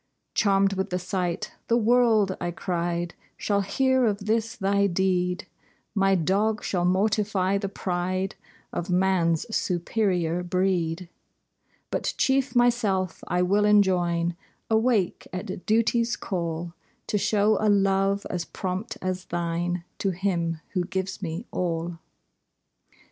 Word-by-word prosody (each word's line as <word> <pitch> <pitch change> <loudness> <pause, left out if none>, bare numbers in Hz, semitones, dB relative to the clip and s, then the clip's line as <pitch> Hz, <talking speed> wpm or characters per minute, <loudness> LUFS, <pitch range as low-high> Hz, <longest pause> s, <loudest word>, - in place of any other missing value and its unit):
Charmed 195 -1 +3
with 190 +1 -2
the 180 - -1
sight, 180 -1 -2 0.2
"The 235 - +3
world," 225 -4 +3
I 175 - -1
cried, 175 -1 -2 0.2
"Shall 200 -1 +1
hear 260 +5 +2
of 200 -1 -1
this 225 +2 0
thy 200 0 +2
deed; 180 -1 0 0.5
My 195 -2 +3
dog 200 +5 +1
shall 175 -2 0
mortify 200 0 +1
the 195 - -3
pride 185 0 -2 0.4
Of 175 - -3
man's 180 -3 +2
superior 180 -2 0
breed: 180 -1 0 0.8
"But - - -1
chief 270 0 +1
myself 215 -7 +2
I 180 +1 +1
will 200 +3 +3
enjoin 175 -5 +3 0.4
Awake 220 -4 +2
at 185 0 -6
duty's 230 +2 +2
call, 170 -2 -3 0.3
To 210 - 0
show 210 +1 +3
a 215 - +4
love 195 0 +2
as 180 -2 -2
prompt 190 +5 -4
as 185 0 -2
thine 175 +1 -2 0.2
To 195 - +1
Him 170 -3 -1
who 180 -2 +1
gives 190 +2 -3
me 170 +4 -4
all." 170 -1 -2
190 Hz, 125 wpm, -26 LUFS, 175-205 Hz, 0.8 s, a